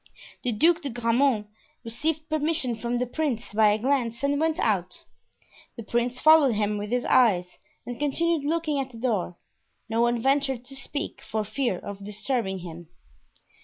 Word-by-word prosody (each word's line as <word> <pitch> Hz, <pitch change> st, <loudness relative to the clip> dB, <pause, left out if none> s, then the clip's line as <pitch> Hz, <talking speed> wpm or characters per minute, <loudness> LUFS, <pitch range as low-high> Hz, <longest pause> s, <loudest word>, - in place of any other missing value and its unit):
The 250 Hz, -, +1 dB
Duc 330 Hz, +10 st, +3 dB
de 285 Hz, -, -3 dB
Grammont 240 Hz, -1 st, +1 dB, 0.4 s
received 310 Hz, +7 st, -2 dB
permission 310 Hz, -5 st, 0 dB
from 235 Hz, +2 st, -2 dB
the 250 Hz, -, 0 dB
prince 245 Hz, -5 st, -3 dB
by 215 Hz, 0 st, +5 dB
a 210 Hz, -, +2 dB
glance 245 Hz, 0 st, -1 dB
and 285 Hz, 0 st, +1 dB
went 320 Hz, 0 st, +1 dB
out. -, -, -1 dB, 0.7 s
The 230 Hz, -, -7 dB
prince 240 Hz, +3 st, -1 dB
followed 310 Hz, -6 st, +6 dB
him 210 Hz, 0 st, 0 dB
with 205 Hz, 0 st, -5 dB
his 245 Hz, +1 st, 0 dB
eyes 180 Hz, -8 st, +3 dB, 0.3 s
and 245 Hz, -1 st, -6 dB
continued 315 Hz, +2 st, +1 dB
looking 310 Hz, -1 st, 0 dB
at 270 Hz, -1 st, -3 dB
the 235 Hz, -, -12 dB
door; 215 Hz, -7 st, -1 dB, 0.5 s
no 225 Hz, +1 st, 0 dB
one 240 Hz, 0 st, +2 dB
ventured 270 Hz, -1 st, +1 dB
to 270 Hz, +2 st, -8 dB
speak, 285 Hz, +3 st, -5 dB
for 220 Hz, 0 st, -3 dB
fear 215 Hz, -1 st, -1 dB
of 200 Hz, +2 st, -8 dB
disturbing 210 Hz, -1 st, -2 dB
him. 170 Hz, 0 st, -9 dB
245 Hz, 165 wpm, -26 LUFS, 220-285 Hz, 0.7 s, followed